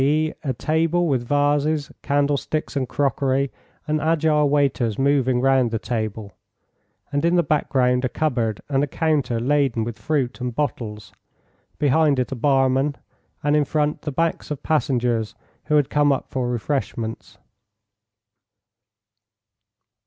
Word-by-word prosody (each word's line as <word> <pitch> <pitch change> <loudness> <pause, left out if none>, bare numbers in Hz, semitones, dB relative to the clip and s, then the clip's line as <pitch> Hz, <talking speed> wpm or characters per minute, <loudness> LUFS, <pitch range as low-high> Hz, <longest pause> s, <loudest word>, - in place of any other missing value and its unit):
e., 155 +3 +2
a 140 - -1
table 165 +6 +1
with 130 -5 +1
vases, 145 +1 +1
candlesticks 145 +2 -1
and 130 -3 -1
crockery, 135 -1 0 0.4
and 155 0 0
agile 155 -2 +2
waiters 135 -6 +1
moving 135 -2 +2
round 135 -2 +3
the 115 - -1
table, 110 -3 -4 0.8
and 145 +1 0
in 170 +1 +3
the 175 - +4
background 130 -4 +1
a 130 - +1
cupboard 120 -8 -1
and 140 -1 +1
a - - 0
counter 145 -6 0
laden 135 -2 +1
with 110 -1 -6
fruit 130 +1 -1
and 125 -2 -3
bottles, 115 -7 -4 0.6
behind 145 0 +3
it 125 0 -1
a - - -2
barman, 135 +2 +2 0.5
and 145 +1 +2
in 150 - +4
front 150 +1 -1
the 150 - -4
backs 165 +4 -1
of 150 -2 -5
passengers 125 -7 0 0.3
who 150 - +1
had 145 -3 +2
come 145 -1 +3
up 135 - -2
for 125 -2 -1
refreshments. 115 - -3
140 Hz, 140 wpm, -22 LUFS, 125-150 Hz, 0.8 s, the